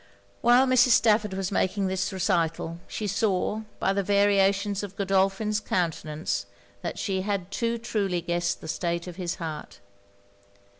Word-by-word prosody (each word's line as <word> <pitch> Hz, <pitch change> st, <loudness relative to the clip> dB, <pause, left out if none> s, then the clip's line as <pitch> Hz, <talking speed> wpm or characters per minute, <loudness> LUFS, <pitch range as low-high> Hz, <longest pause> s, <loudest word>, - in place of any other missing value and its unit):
While 245 Hz, +2 st, +6 dB
Mrs. 255 Hz, -1 st, +5 dB
Stafford 210 Hz, -3 st, +3 dB
was 190 Hz, 0 st, -2 dB
making 195 Hz, +1 st, 0 dB
this 190 Hz, +1 st, -1 dB
recital, 170 Hz, -3 st, -1 dB
she 215 Hz, -, -4 dB
saw, 205 Hz, +1 st, 0 dB, 0.2 s
by 195 Hz, -, +1 dB
the 200 Hz, -, +1 dB
variations 200 Hz, 0 st, +2 dB
of 200 Hz, -1 st, -7 dB
Godolphin's 195 Hz, +2 st, +1 dB
countenance, 160 Hz, -5 st, -2 dB, 0.3 s
that -, -, -4 dB
she 190 Hz, -2 st, -1 dB
had 195 Hz, -2 st, -3 dB
too 235 Hz, +2 st, -1 dB
truly 200 Hz, -6 st, -1 dB
guessed 175 Hz, 0 st, -1 dB
the -, -, -8 dB
state 170 Hz, +1 st, -2 dB
of 180 Hz, -1 st, -8 dB
his 175 Hz, -2 st, -3 dB
heart. 160 Hz, -4 st, -7 dB
195 Hz, 145 wpm, -26 LUFS, 175-210 Hz, 0.3 s, While